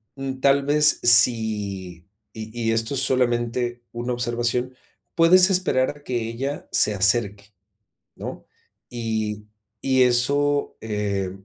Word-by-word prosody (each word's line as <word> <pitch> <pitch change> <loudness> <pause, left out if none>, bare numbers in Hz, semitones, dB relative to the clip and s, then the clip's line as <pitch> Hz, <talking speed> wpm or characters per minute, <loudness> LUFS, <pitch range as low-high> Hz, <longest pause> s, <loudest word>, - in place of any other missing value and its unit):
mm, 135 -1 -6
tal 140 0 +3
vez 150 +1 +3
si 105 -7 +2 0.3
y 110 0 -9 0.2
y - - +2
esto 115 +4 -1
es - - +4
solamente 120 -1 -1
una 120 +1 -4
observación, 120 +1 -2 0.4
puedes 180 +3 +5
esperar 180 -9 +1
a 145 - -21
que 120 -4 -4
ella 135 +5 -6
se 105 - +2
acerque, 105 0 0 0.6
¿no? - - -8 0.5
Y 110 -3 -4 0.3
y 130 -1 +1
eso, 140 +4 +1
eh, 105 -3 -3
120 Hz, 120 wpm, -22 LUFS, 110-135 Hz, 0.6 s, puedes